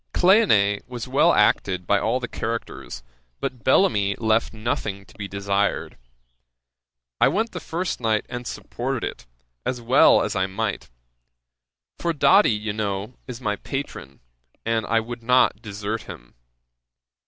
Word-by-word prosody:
Cleone 110 Hz, -, +4 dB
was 125 Hz, -2 st, -6 dB
well -, -, +4 dB
acted 90 Hz, -2 st, +2 dB
by 100 Hz, -, +3 dB
all 115 Hz, +4 st, 0 dB
the 120 Hz, -, -4 dB
characters, 115 Hz, -, -5 dB, 0.4 s
but 125 Hz, -4 st, -4 dB
Bellamy 105 Hz, -, +3 dB
left 110 Hz, 0 st, +1 dB
nothing 105 Hz, -3 st, -3 dB
to -, -, -19 dB
be 105 Hz, -2 st, -6 dB
desired. 100 Hz, 0 st, -1 dB, 1.2 s
I -, -, +6 dB
went 220 Hz, +5 st, 0 dB
the 180 Hz, -, -5 dB
first 175 Hz, +2 st, -3 dB
night, 110 Hz, -2 st, +1 dB
and 125 Hz, 0 st, -6 dB
supported 130 Hz, 0 st, -4 dB
it, -, -, -9 dB, 0.4 s
as 125 Hz, -, -2 dB
well 120 Hz, +2 st, +5 dB
as 105 Hz, -, -2 dB
I 95 Hz, 0 st, +1 dB
might; 95 Hz, +1 st, -3 dB, 1.1 s
for 170 Hz, -1 st, 0 dB
Doddy, 190 Hz, +7 st, +5 dB
you 105 Hz, 0 st, -2 dB
know, 105 Hz, +2 st, -3 dB
is 125 Hz, -2 st, -7 dB
my 105 Hz, -4 st, -2 dB
patron, 135 Hz, -, -6 dB, 0.4 s
and 115 Hz, -1 st, 0 dB
I 115 Hz, +1 st, +3 dB
would 120 Hz, +1 st, -6 dB
not 125 Hz, +2 st, +3 dB
desert 105 Hz, +1 st, -4 dB
him. -, -, -11 dB
110 Hz, 140 wpm, -23 LUFS, 100-125 Hz, 1.2 s, I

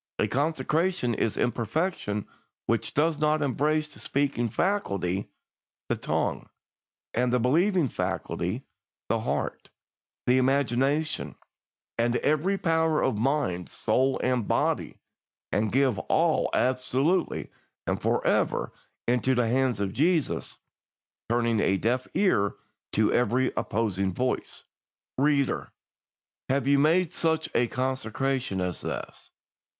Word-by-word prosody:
A -, -, +2 dB
consecration 155 Hz, 0 st, 0 dB
is 110 Hz, 0 st, -1 dB
imperfect 125 Hz, -, -1 dB, 0.6 s
which -, -, -1 dB
does 155 Hz, +1 st, +2 dB
not 155 Hz, 0 st, +2 dB
embrace 150 Hz, +3 st, +1 dB
the -, -, -14 dB
speaking 135 Hz, -4 st, 0 dB
faculty" 100 Hz, -, -1 dB, 0.6 s
(the -, -, +2 dB
tongue), -, -, -2 dB, 0.6 s
"and 125 Hz, +1 st, +1 dB
the 125 Hz, -, +3 dB
believing 165 Hz, -, +3 dB
faculty" -, -, -3 dB, 0.5 s
(the -, -, +2 dB
heart), -, -, -3 dB, 0.6 s
"the 125 Hz, +1 st, +4 dB
imagination, 135 Hz, +3 st, +1 dB, 0.6 s
and 120 Hz, +1 st, +2 dB
every 155 Hz, +9 st, +1 dB
power 160 Hz, -3 st, +2 dB
of 110 Hz, -5 st, 0 dB
mind, 120 Hz, -9 st, 0 dB
soul, 130 Hz, +1 st, +1 dB
and 125 Hz, -4 st, +1 dB
body, -, -, 0 dB, 0.5 s
and 105 Hz, 0 st, +1 dB
give 130 Hz, -4 st, +2 dB
all -, -, +3 dB
absolutely 130 Hz, +7 st, +1 dB, 0.3 s
and -, -, -1 dB
for -, -, 0 dB
ever -, -, +1 dB, 0.3 s
into 125 Hz, +2 st, +2 dB
the 120 Hz, -1 st, +2 dB
hands 125 Hz, -2 st, +1 dB
of 100 Hz, -1 st, -1 dB
Jesus, 160 Hz, +3 st, 0 dB, 0.7 s
turning 115 Hz, -1 st, +2 dB
a 95 Hz, -1 st, +2 dB
deaf 125 Hz, +5 st, 0 dB
ear 100 Hz, -, +2 dB, 0.4 s
to 110 Hz, 0 st, +3 dB
every 125 Hz, +2 st, +2 dB
opposing 100 Hz, -4 st, 0 dB
voice. 125 Hz, 0 st, -2 dB, 0.6 s
"Reader, 140 Hz, -1 st, +1 dB, 0.8 s
have 135 Hz, 0 st, +1 dB
you 140 Hz, 0 st, +5 dB
made 165 Hz, +4 st, +3 dB
such 160 Hz, -1 st, +1 dB
a 120 Hz, -, +3 dB
consecration 130 Hz, -4 st, -1 dB
as 90 Hz, -1 st, -2 dB
this? -, -, -6 dB
130 Hz, 115 wpm, -27 LUFS, 120-155 Hz, 0.8 s, you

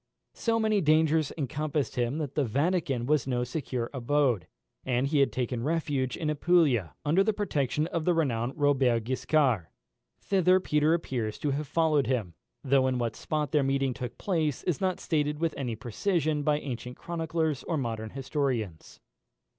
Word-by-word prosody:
So 230 Hz, -1 st, 0 dB
many 215 Hz, -2 st, +2 dB
dangers 155 Hz, -1 st, +3 dB
encompassed 150 Hz, 0 st, -2 dB
him, 120 Hz, +3 st, 0 dB
that 145 Hz, -4 st, -3 dB
the 145 Hz, -, +1 dB
Vatican 140 Hz, -, 0 dB
was 145 Hz, -1 st, +1 dB
no 125 Hz, -2 st, 0 dB
secure 125 Hz, -2 st, -3 dB
abode, 130 Hz, -, +1 dB, 0.4 s
and 125 Hz, 0 st, 0 dB
he 145 Hz, +1 st, +1 dB
had 140 Hz, -, +3 dB
taken 125 Hz, -2 st, -2 dB
refuge 145 Hz, -4 st, -1 dB
in 160 Hz, -, -3 dB
Apulia, 150 Hz, -, +2 dB
under 165 Hz, +7 st, +4 dB
the 220 Hz, +1 st, +1 dB
protection 150 Hz, -, 0 dB
of 165 Hz, -1 st, -2 dB
the 175 Hz, +1 st, +2 dB
renowned 125 Hz, -6 st, 0 dB
Robert 135 Hz, -6 st, +2 dB
Guiscard. 130 Hz, -, +1 dB, 0.5 s
Thither 185 Hz, -1 st, +3 dB
Peter 150 Hz, -2 st, +2 dB
appears 120 Hz, -10 st, -3 dB
to 145 Hz, -, -1 dB
have 145 Hz, +2 st, -2 dB
followed 150 Hz, -3 st, +2 dB
him, 115 Hz, -9 st, -1 dB, 0.3 s
though 135 Hz, -1 st, +3 dB
in 130 Hz, -1 st, 0 dB
what 120 Hz, -2 st, -2 dB
spot 150 Hz, -2 st, -2 dB
their 150 Hz, -, +3 dB
meeting 135 Hz, -1 st, +1 dB
took 125 Hz, -2 st, -6 dB
place 160 Hz, -7 st, -1 dB
is 175 Hz, -6 st, -1 dB
not 185 Hz, -2 st, 0 dB
stated 150 Hz, -2 st, 0 dB
with 165 Hz, 0 st, 0 dB
any 125 Hz, -5 st, -3 dB
precision 150 Hz, -, -1 dB
by 150 Hz, 0 st, +2 dB
ancient 125 Hz, -3 st, -6 dB
chroniclers 160 Hz, -3 st, -2 dB
or 165 Hz, -, -2 dB
modern 115 Hz, -4 st, -3 dB
historians. 130 Hz, -, -3 dB
145 Hz, 165 wpm, -28 LUFS, 125-160 Hz, 0.5 s, under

